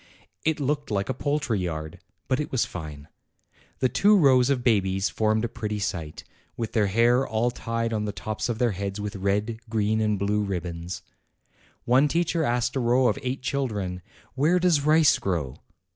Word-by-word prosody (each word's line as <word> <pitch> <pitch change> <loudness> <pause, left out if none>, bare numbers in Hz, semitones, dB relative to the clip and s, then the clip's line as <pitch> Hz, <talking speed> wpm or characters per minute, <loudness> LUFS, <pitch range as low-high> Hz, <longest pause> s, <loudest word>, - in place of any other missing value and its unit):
It 160 -1 +1
looked 145 +1 -1
like 100 -2 -1
a - - +1
poultry 145 -5 -1
yard. 80 -3 -4 0.3
But 130 - +1
it 150 - -3
was 130 - +1
fine. 75 -4 -8 0.7
The 130 - +4
two 205 +10 +4
rows 130 -6 +5
of 130 -3 +1
babies 95 -4 +1
formed 110 +1 +1
a - - 0
pretty 105 -2 -4
sight, 85 -7 -4 0.3
with 115 -2 -4
their 105 -3 +2
hair 120 +6 +3
all 110 +3 0
tied 115 -1 -3
on 105 -1 -1
the 105 - -2
tops 110 +3 -4
of 115 - -1
their 120 -1 +2
heads 100 +1 -4
with 105 +1 -4
red, 105 +3 -1
green, 110 0 +1
and 105 -1 +1
blue 100 +2 0
ribbons. 90 -3 -4 0.8
One 130 +4 +4
teacher 165 +1 0
asked 120 -2 0
a - - +1
row 125 +1 +3
of 110 - -2
eight 130 0 -3
children, 105 -10 -2 0.2
" - - -29
Where 150 +7 +3
does 175 -5 +3
rice 155 +1 +4
grow?" 80 -9 -2
110 Hz, 185 wpm, -25 LUFS, 100-130 Hz, 0.8 s, rows